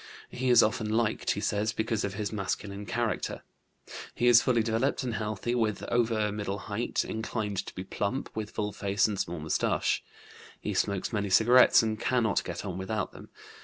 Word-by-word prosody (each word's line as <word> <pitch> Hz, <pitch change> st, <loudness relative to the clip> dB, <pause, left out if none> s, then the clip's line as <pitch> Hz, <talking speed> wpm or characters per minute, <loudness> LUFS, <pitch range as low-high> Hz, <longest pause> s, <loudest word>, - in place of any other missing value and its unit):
He 130 Hz, +1 st, -1 dB
is 120 Hz, -2 st, +7 dB
often 105 Hz, 0 st, 0 dB
liked, 110 Hz, 0 st, 0 dB
he -, -, +1 dB
says, 105 Hz, +1 st, 0 dB
because 110 Hz, -1 st, -1 dB
of 100 Hz, -1 st, -3 dB
his 105 Hz, +1 st, -3 dB
masculine 100 Hz, 0 st, -4 dB
character. 120 Hz, -1 st, -2 dB, 0.7 s
He 120 Hz, -, 0 dB
is 120 Hz, -1 st, +8 dB
fully 120 Hz, -4 st, +2 dB
developed 115 Hz, +5 st, 0 dB
and 125 Hz, -3 st, -2 dB
healthy, 110 Hz, +2 st, -2 dB
well 110 Hz, -4 st, +1 dB
over 115 Hz, -3 st, +1 dB
middle 100 Hz, -1 st, -3 dB
height, 100 Hz, +4 st, -2 dB
inclined 110 Hz, -3 st, -3 dB
to -, -, -9 dB
be 95 Hz, -, -5 dB
plump, 100 Hz, +6 st, -3 dB
with 110 Hz, -1 st, -3 dB
full 105 Hz, -1 st, -3 dB
face 100 Hz, 0 st, +1 dB
and 105 Hz, -3 st, -3 dB
small 85 Hz, -3 st, -2 dB
moustache. 80 Hz, +1 st, 0 dB, 0.6 s
He -, -, -3 dB
smokes 100 Hz, +3 st, -1 dB
many 100 Hz, -2 st, -1 dB
cigarettes 120 Hz, +6 st, +6 dB
and 110 Hz, -1 st, -2 dB
cannot 120 Hz, -4 st, +1 dB
get -, -, -5 dB
on 95 Hz, -2 st, -4 dB
without 105 Hz, +3 st, -2 dB
them. -, -, -13 dB
110 Hz, 180 wpm, -29 LUFS, 100-115 Hz, 0.7 s, is